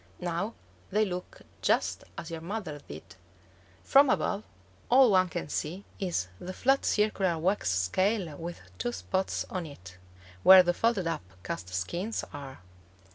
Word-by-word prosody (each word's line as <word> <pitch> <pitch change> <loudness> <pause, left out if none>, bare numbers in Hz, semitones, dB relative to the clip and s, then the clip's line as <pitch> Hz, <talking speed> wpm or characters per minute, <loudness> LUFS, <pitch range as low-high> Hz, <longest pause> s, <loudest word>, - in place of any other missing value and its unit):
Now 180 +5 -2 0.3
they 215 +2 +2
look 180 -2 -6 0.2
just - - +1
as 165 - -6
your 165 -1 -5
mother 175 -5 -5
did. 75 +2 -8 0.8
From 275 0 +6
above, 205 -4 +1 0.5
all 255 -2 +7
one 185 -1 +4
can 175 -3 -4
see 170 +6 -4
is 175 - -1
the 185 - -6
flat 270 +7 +2
circular 200 -5 +2
wax 185 - +1
scale 165 - +1
with 170 +3 -7 0.2
two 120 +7 -1
spots 95 - -2
on 180 -3 -3
it, 90 -10 -12 0.4
where 190 - +10
the 175 0 +1
folded 225 -2 +1
up 165 -8 -1 0.2
cast 90 -1 -5
skins 175 - -2
are. 135 -6 -8
180 Hz, 145 wpm, -29 LUFS, 145-200 Hz, 0.8 s, where